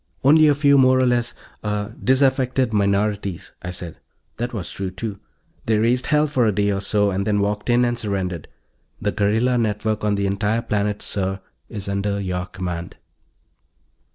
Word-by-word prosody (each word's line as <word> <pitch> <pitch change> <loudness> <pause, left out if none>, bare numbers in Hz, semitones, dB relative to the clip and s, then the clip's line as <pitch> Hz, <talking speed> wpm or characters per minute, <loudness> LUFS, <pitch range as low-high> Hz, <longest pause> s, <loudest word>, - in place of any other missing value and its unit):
"Only 155 +3 +6
a 145 - +4
few 140 -1 +4
more 130 0 +5
or 130 - +3
less... 120 -1 0 0.3
ah... 105 0 -2
disaffected 130 -2 +2
minorities," 100 -2 0
I 90 - -6
said. 90 -2 -6 0.4
That 120 +1 -3
was 105 -7 -5
true, 95 -1 -4
too. 100 +2 -6 0.5
"They 110 -1 +3
raised 120 +4 +1
hell 150 0 +3
for 130 -6 +1
a - - +3
day 100 0 +1
or 95 -1 -1
so, 100 -1 +1
then 100 +2 0
walked 105 +2 -1
in 120 +1 +4
and 120 0 -1
surrendered. 95 -6 -3 0.5
The 105 - -1
guerrilla 110 +5 +1
network 110 -1 -1
on 105 -1 +2
the 100 0 -1
entire 105 +4 0
planet, 105 -2 -1
sir, 95 -1 -2 0.3
is 100 -3 -6
under 100 +1 -1
your 90 -2 -3
command." 90 -2 -5
105 Hz, 170 wpm, -22 LUFS, 100-120 Hz, 0.5 s, Only